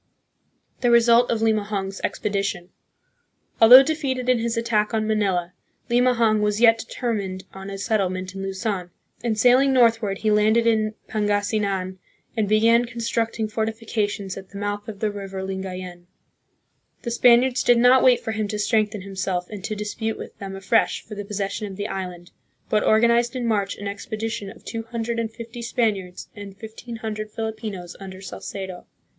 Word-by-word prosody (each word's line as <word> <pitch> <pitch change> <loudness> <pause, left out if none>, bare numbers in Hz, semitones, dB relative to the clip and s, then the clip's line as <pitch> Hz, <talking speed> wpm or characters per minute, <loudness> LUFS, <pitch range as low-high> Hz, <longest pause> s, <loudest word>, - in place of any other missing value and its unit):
The 245 - +2
Result 235 0 +5
of 225 -1 0
Limahong's 205 -3 -1
Expedition. 200 -3 -2 0.9
Although 250 +4 +11
defeated 270 -4 -2
in 250 -2 +4
his 230 +1 -1
attack 225 -2 +1
on 215 -1 0
Manila, 195 -5 0 0.4
Limahong 235 -3 +3
was 210 0 +1
yet 230 -1 +6
de 225 - -6
termined 200 -6 -3
on 195 0 -8
a 195 - -5
settlement 185 -3 -1
in 195 - -6
Luzon, 195 -1 -3 0.3
and, 225 -3 0
sailing 255 +4 +5
northward, 230 -5 +3
he 215 +1 0
landed 215 +2 +3
in 215 -1 +2
Pangasinan 205 -3 -1 0.4
and 215 -3 0
began 230 +3 +4
constructing 230 -1 -2
fortifi 220 +1 -3
cations 205 -3 -2
at 190 -1 -10
the 200 - -10
mouth 205 0 -3
of 210 -2 -8
the 215 -1 +1
river 195 -2 -6
Lingayen. 185 -2 -6 1.0
The 235 - -3
Span 240 0 +6
iards 255 -1 0
did 245 - +5
not 250 +2 +6
wait 250 -2 +5
for 225 - -3
him 215 -1 -2
to 210 - -3
strengthen 210 -1 +1
himself 190 -1 -3
and 205 -3 -7
to 215 - -3
dis 210 0 -4
pute 225 -1 -3
with - - -9
them 195 -1 -6
afresh 195 +4 +1
for 215 - -9
the 205 0 -5
possession 205 0 -3
of 195 - -8
the 205 +1 -3
island, 180 -3 -6 0.4
but 210 - +3
organized 235 +2 +3
in 250 -2 -2
March 205 -4 0
an 205 - -6
expedition 210 +1 -4
of - - -14
two 225 - -4
hundred 230 0 -3
and 225 -1 -2
fifty 230 +1 -9
Spaniards 210 -7 -2
and 200 -2 -9
fifteen 225 +2 -9
hundred 215 -1 -5
Filipinos 215 -5 -5
under 190 -1 -9
Salcedo. 190 -1 -7
215 Hz, 170 wpm, -23 LUFS, 195-230 Hz, 1.0 s, Although